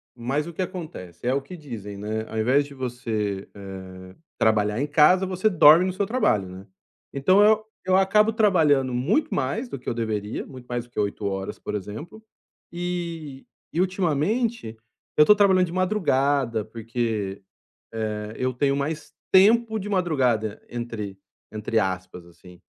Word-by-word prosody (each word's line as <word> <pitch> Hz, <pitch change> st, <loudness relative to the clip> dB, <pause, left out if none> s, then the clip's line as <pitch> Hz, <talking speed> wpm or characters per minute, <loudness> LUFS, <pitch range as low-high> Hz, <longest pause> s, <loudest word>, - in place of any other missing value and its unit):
mas 135 Hz, +6 st, -2 dB
o 170 Hz, -, -7 dB
que 185 Hz, -, -4 dB
acontece, 160 Hz, -, -6 dB
é 125 Hz, -, +3 dB
o 140 Hz, -, 0 dB
que 180 Hz, +7 st, -10 dB
dizem, 115 Hz, -, -8 dB
né, 110 Hz, +2 st, -3 dB
ao 110 Hz, -, -5 dB
invés 130 Hz, +6 st, +3 dB
de 140 Hz, -, -12 dB
você, 115 Hz, -6 st, -3 dB
eh, 95 Hz, -2 st, -10 dB, 0.2 s
trabalhar 110 Hz, +1 st, +2 dB
em 145 Hz, -, 0 dB
casa, 155 Hz, +6 st, +5 dB
você 185 Hz, +3 st, +1 dB
dorme 165 Hz, 0 st, +7 dB
no 185 Hz, -, -1 dB
seu 200 Hz, +2 st, -1 dB
trabalho, 195 Hz, -, +1 dB
né. 95 Hz, +2 st, -11 dB, 0.5 s
Então 185 Hz, +9 st, +4 dB
eu 215 Hz, +1 st, +4 dB, 0.2 s
eu 185 Hz, 0 st, +3 dB
acabo 210 Hz, +3 st, +4 dB
trabalhando 155 Hz, -, +3 dB
muito 170 Hz, -, +1 dB
mais 215 Hz, -, -2 dB
do 140 Hz, -, -6 dB
que -, -, -20 dB
eu -, -, 0 dB
deveria, 110 Hz, -2 st, -3 dB
muito 130 Hz, -2 st, -12 dB
mais 120 Hz, -1 st, -3 dB
do 120 Hz, -, -21 dB
que -, -, -5 dB
8 100 Hz, 0 st, -2 dB
horas, 95 Hz, -1 st, -3 dB
por -, -, -6 dB
exemplo, 110 Hz, -, -7 dB, 0.5 s
e 170 Hz, -5 st, -5 dB, 0.3 s
e 165 Hz, -, -1 dB
ultimamente, 185 Hz, -, 0 dB, 0.4 s
eu 150 Hz, -, +7 dB
tô 210 Hz, -, +7 dB
trabalhando 190 Hz, -3 st, +4 dB
de -, -, -8 dB
madrugada, 140 Hz, -, +1 dB
porque, 110 Hz, -3 st, -3 dB, 0.5 s
eh, 110 Hz, -1 st, -4 dB
eu 130 Hz, 0 st, -1 dB
tenho 140 Hz, +2 st, +1 dB
mais 150 Hz, +2 st, -4 dB, 0.2 s
"tempo" 220 Hz, +4 st, +5 dB
de 205 Hz, -, -6 dB
madrugada, 130 Hz, -, 0 dB
entre 115 Hz, -5 st, -5 dB, 0.3 s
entre 110 Hz, +1 st, -1 dB
aspas, 95 Hz, -2 st, -4 dB
assim, 90 Hz, +1 st, -17 dB
135 Hz, 165 wpm, -24 LUFS, -, 0.5 s, dorme